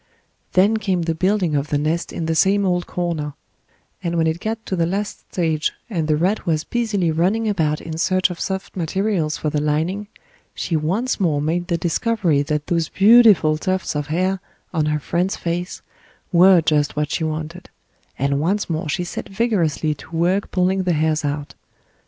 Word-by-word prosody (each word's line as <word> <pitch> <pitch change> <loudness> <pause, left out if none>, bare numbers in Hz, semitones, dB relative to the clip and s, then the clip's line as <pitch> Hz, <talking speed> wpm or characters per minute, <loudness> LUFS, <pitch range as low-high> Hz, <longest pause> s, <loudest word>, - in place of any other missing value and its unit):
Then 200 +4 +4
came 190 -5 -1
the 165 0 0
building 185 -1 +1
of 140 +1 0
the 145 - 0
nest 155 +3 -1
in 165 - -4
the 165 - 0
same 195 +5 +3
old 180 -1 0
corner, 165 -5 -3 0.7
and 170 -2 -2
when 165 - +2
it 160 +1 0
got 220 +2 -4
to 190 - -2
the 170 -2 +1
last 200 +3 -4
stage 160 -4 0 0.2
and 165 -6 -1
the 155 - +3
rat 185 +7 0
was 155 -2 +1
busily 205 -6 0
running 190 +8 +1
about 160 -7 0
in 160 0 -6
search 185 +1 +2
of 175 - -7
soft 190 0 -4
materials 180 -2 -1
for 155 - -2
the 150 -1 0
lining, 160 +7 -1 0.5
she 170 - -2
once 190 +13 0
more 160 -7 +1
made 170 +4 -1
the 170 -2 0
discovery 175 -2 +1
that 150 +1 -2
those 165 -2 0
beautiful 205 -8 +6
tufts 185 -1 -1
of 145 -1 -2
hair 185 +5 0 0.3
on 155 -2 +1
her 150 0 0
friend's 175 +5 -1
face 175 +2 -4 0.5
were 180 0 +6
just 150 -2 +1
what 150 0 -1
she - - -1
wanted, 160 +3 -4 0.5
and 140 +1 0
once 195 +7 0
more 160 0 -2
she 180 +4 -1
set 175 - -6
vigorously 190 -8 0
to 160 +3 -11
work 180 +4 +1
pulling 185 +1 +1
the 180 -2 +1
hairs 155 0 +1
out. 145 0 -3
170 Hz, 185 wpm, -21 LUFS, 155-190 Hz, 0.7 s, beautiful